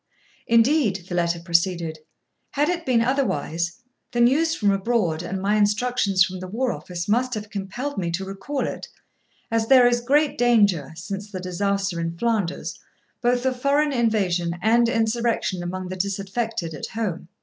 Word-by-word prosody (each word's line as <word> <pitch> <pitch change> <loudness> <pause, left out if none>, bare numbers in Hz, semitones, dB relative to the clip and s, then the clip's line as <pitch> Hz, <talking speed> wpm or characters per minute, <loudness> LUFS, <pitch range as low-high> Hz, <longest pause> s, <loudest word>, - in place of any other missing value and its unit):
'Indeed,' 230 - +3
the 180 - -6
letter 170 -1 0
proceeded, 170 -1 0 0.5
'had 295 +2 +1
it 345 -3 -2
been 235 -3 +3
otherwise, 175 - -1 0.3
the 240 - 0
news 295 +7 +3
from 205 -2 +2
abroad 195 -5 0
and 185 +2 -4
my 200 +2 +1
instructions 210 -2 +2
from 185 0 -4
the 185 - -6
War 240 +6 -1
Office 175 -5 -6
must 245 +3 +1
have 210 0 -6
compelled 210 +7 -4
me 175 -3 -1
to 190 +3 -2
recall 195 +9 -3
it, - - -5 0.6
as 225 -1 +1
there 255 -1 +7
is 240 0 +2
great 285 +4 +2
danger, 205 - +3
since 195 +4 -6
the 185 - -5
disaster 195 0 -1
in 165 0 -3
Flanders, 215 -5 -1 0.4
both 245 +1 +1
of 255 -1 -1
foreign 290 +2 +2
invasion 190 -8 +1
and 230 +4 +3
insurrection 230 -4 0
among 185 +1 -5
the 185 - -4
disaffected 195 -1 -3
at 150 - -5
home. 210 -7 -4
205 Hz, 160 wpm, -23 LUFS, 180-240 Hz, 0.6 s, there